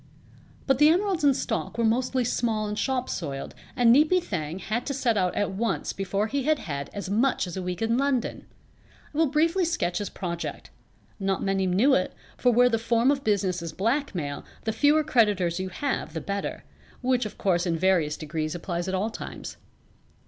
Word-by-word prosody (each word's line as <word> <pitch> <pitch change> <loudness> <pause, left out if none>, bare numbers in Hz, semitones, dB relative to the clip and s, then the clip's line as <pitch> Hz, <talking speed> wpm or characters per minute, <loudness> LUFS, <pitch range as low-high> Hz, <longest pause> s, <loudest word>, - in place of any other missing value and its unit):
But 270 -2 +2
the 300 +1 +7
emeralds 365 0 +1
in 280 -2 +5
stock - - -3
were 235 - +1
mostly 250 +3 +1
small 225 -2 0
and 210 0 -3
shop 260 -2 0
soiled 140 -5 -4 0.2
and 235 -1 +6
Neepy 305 +7 +5
Thang 170 - -4
had 215 +6 -2
to 280 - -1
set 245 -4 +1
out 185 -3 +1
at 205 - 0
once 220 +4 -2
before 195 +1 -1
he 275 +5 -1
had 305 +3 +2
had 140 - -5
as 200 -2 -5
much 225 +4 +1
as 175 - -7
a 190 - -3
week 180 +2 -3
in 230 +2 +1
London. 275 -4 -1 0.7
I - - -7
will 325 - +5
briefly 330 +6 +2
sketch 330 - 0
his 205 -2 -3
project. 170 -2 -5 0.5
Not 195 -1 -1
many 195 -1 +1
knew 210 +10 +4
it, 185 - +1 0.2
for 250 - +3
where 245 +1 +5
the 225 -2 +1
form 230 +3 +3
of 280 -1 -1
business 190 -4 +1
is 165 -2 -5
blackmail 195 - -1 0.2
the 220 - -1
fewer 290 +7 +4
creditors 205 - +2
you 190 0 -3
have 225 - -3
the - - -1
better 200 0 -4 0.4
(which 250 -2 +1
of - - -12
course 180 -2 +1
in 165 -1 0
various 170 -4 +2
degrees 155 +1 -3
applies 175 0 -3
at 190 - -1
all 210 +4 -1
times). - - -7
215 Hz, 195 wpm, -26 LUFS, 185-260 Hz, 0.7 s, the